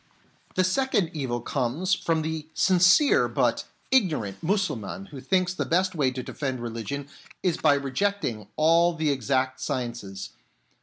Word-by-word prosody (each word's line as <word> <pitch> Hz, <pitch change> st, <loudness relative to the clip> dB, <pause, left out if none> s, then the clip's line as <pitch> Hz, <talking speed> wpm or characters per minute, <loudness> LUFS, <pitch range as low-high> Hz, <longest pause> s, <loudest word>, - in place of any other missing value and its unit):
The 185 Hz, -, +3 dB
second 200 Hz, -2 st, +1 dB
evil 130 Hz, -6 st, -2 dB
comes 140 Hz, +10 st, -1 dB
from 160 Hz, -3 st, 0 dB
the 160 Hz, -1 st, -4 dB
sincere 185 Hz, -, +5 dB
but -, -, 0 dB, 0.3 s
ignorant 160 Hz, -, +1 dB
Mussulman 195 Hz, -, -2 dB
who 135 Hz, -3 st, -8 dB
thinks 185 Hz, +6 st, +1 dB
the -, -, -2 dB
best 185 Hz, +2 st, +1 dB
way 145 Hz, -6 st, +2 dB
to 130 Hz, 0 st, -5 dB
defend 130 Hz, -2 st, -4 dB
religion 120 Hz, +4 st, -5 dB, 0.4 s
is 180 Hz, -3 st, +1 dB
by 145 Hz, -, +4 dB
rejecting 140 Hz, -, -2 dB
all 165 Hz, +2 st, +4 dB
the 155 Hz, -2 st, +1 dB
exact 130 Hz, 0 st, 0 dB
sciences. 120 Hz, -6 st, -4 dB
150 Hz, 140 wpm, -26 LUFS, 130-185 Hz, 0.4 s, sincere